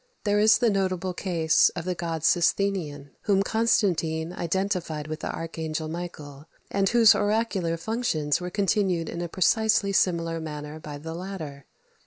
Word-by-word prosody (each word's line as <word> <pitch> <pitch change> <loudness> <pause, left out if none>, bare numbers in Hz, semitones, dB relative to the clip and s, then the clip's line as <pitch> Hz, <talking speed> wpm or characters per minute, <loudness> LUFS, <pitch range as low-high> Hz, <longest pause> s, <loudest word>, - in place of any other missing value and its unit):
There 205 -1 +2
is 215 +1 +6
the 235 -2 +2
notable 185 -2 -1
case 170 -4 +2
of 170 -2 -5
the 185 - -1
god 165 -2 -4
Sosthenion, 170 -6 +1 0.2
whom 195 -1 +4
Constantine 175 -7 +1
identified 175 -3 -2
with 155 0 -5
the - - -4
archangel 160 -1 -4
Michael, 155 -4 -7 0.2
and 195 -1 +2
whose 235 -2 +7
oracular 205 -5 0
functions 165 - -1
were 180 - -4
continued 190 -4 0
in 170 - -5
a 175 - -4
precisely 205 +3 +2
similar 165 -3 +1
manner 150 -1 -7
by 150 -2 -8
the 160 +3 -7
latter. 165 -6 -7
175 Hz, 150 wpm, -26 LUFS, 160-195 Hz, 0.2 s, whose